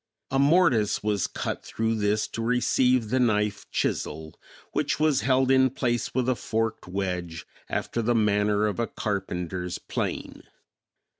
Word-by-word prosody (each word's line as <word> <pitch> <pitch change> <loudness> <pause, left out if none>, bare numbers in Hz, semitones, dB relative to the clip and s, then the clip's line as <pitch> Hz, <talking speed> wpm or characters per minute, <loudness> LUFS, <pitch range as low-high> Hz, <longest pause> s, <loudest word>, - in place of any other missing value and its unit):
A 135 - +2
mortise 140 - +3
was 105 -3 0
cut - - -4
through 115 0 -1
this 105 -1 +1
to 115 - -5
receive 125 0 +2
the 130 - +2
knife 105 -4 +1
chisel, 80 0 -2 0.4
which - - -1
was 155 -3 +3
held 130 +2 +3
in 130 0 +5
place 120 -2 -1
with 130 -1 +1
a 130 - +3
forked 115 -3 -2
wedge 90 -3 -3 0.2
after 120 - -2
the 120 +1 +1
manner 105 -1 +2
of 105 +1 -2
a 115 - 0
carpenter's 90 -4 -3
plane. - - -4
110 Hz, 145 wpm, -26 LUFS, 100-125 Hz, 0.4 s, in